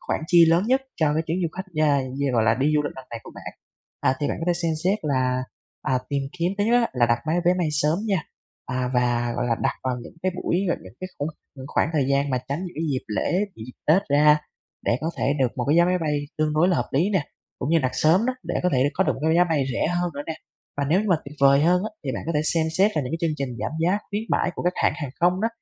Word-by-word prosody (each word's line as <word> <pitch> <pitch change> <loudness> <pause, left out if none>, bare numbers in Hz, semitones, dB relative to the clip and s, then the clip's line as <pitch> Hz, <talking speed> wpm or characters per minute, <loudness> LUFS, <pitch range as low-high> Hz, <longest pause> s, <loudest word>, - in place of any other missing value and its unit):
khoản - - -2
chi 170 0 +7
lớn 170 +3 +3
nhất 260 +2 +2
cho 150 -3 +2
cái 160 - +1
chuyến 165 +2 -1
du 170 - +1
khách, 190 +1 -5
yeah, 145 -3 +3 0.2
như, 140 -1 +1
gọi 115 -2 +3
là, 110 0 +4
đi 140 +5 +1
du 150 - +3
lịch 145 - -4
lần 130 -1 -10
này 115 - -6
của - - -11
bạn. - - -8 0.5
À, 130 - +2
thì 145 - 0
bạn - - -2
có - - -2
thể 175 - +3
xem 165 -1 +1
xét 200 +3 +2
là, 130 -3 0 0.4
à, 130 -1 +1
tìm 140 -1 -1 0.2
kiếm 175 +3 +1
thứ 205 - +2
nhất 230 - +1
á 230 - +1
là 120 -2 +3
đặt 120 0 +2
máy 160 +2 +1
vé 180 +1 +4
bay 170 -3 +1
sớm 150 +4 +2
nha, 190 -7 +1 0.4
à, 125 -1 -2
và, 120 -1 +1
gọi 120 0 -1
là, 115 -1 +1
đặt - - +1
vào 130 -1 -1
những - - -12
cái 185 - 0
buổi 180 0 0
và - - +2
những 95 - -12
cái 185 - -5
khung, 145 +2 -1 0.3
những 130 0 -8
khoảng 155 - +1
thời 145 -4 +2
gian 140 0 +1
mà 130 - +1
tránh 140 +3 -1
những 180 - -8
cái 160 - -3
dịp 130 - -2
lễ, 105 - -1 0.2
những 110 - -9
dịp 125 - -10
Tết 175 +6 +5
ra 150 +1 +5 0.5
để 120 - +2
có 160 +2 -1
thể 140 - +1
được 130 - +4
một 125 - -1
cái 160 +3 +4
vé 170 - +6
máy 180 0 +1
bay 150 -3 -1
tương 155 -1 +1
đối 170 +4 +4
là 180 - +2
hợp - - -1
lý 170 +10 +2
nè, 185 -8 +1 0.3
cũng 135 - -2
như 165 - +5
đặt 130 -3 0
sớm 160 - +3
đó, 255 - 0
để - - -4
có 180 - +3
thể 135 +2 +3
có 190 - +2
được - - +2
một - - -9
cái 160 - +3
giá 175 - +6
bay 160 -5 +1
rẻ - - 0
hơn 175 0 0
nữa 145 - -4
nè. 160 - -3 0.4
Và 140 - 0
nếu 175 +6 +3
như 215 - -2
mà 175 - +4
tuyệt 150 +2 -10
vời 140 0 +6
hơn 180 +2 +3
á - - -3
thì 130 - -2
bạn - - -4
có 165 - -1
thể 150 - +3
xem 160 0 +2
xét 200 +3 +5
là 150 - +2
những 125 - -5
cái 165 - -1
chương 160 -2 0
trình 130 -4 -4
giảm - - -2
giá, 180 +5 +2
khuyến 205 +2 -2
mãi - - +1
của - - -5
các 180 +1 +1
hãng - - +2
hàng 145 -6 -5
không 180 +2 +3
đó, 225 - +2
155 Hz, 305 wpm, -24 LUFS, 130-175 Hz, 0.5 s, chi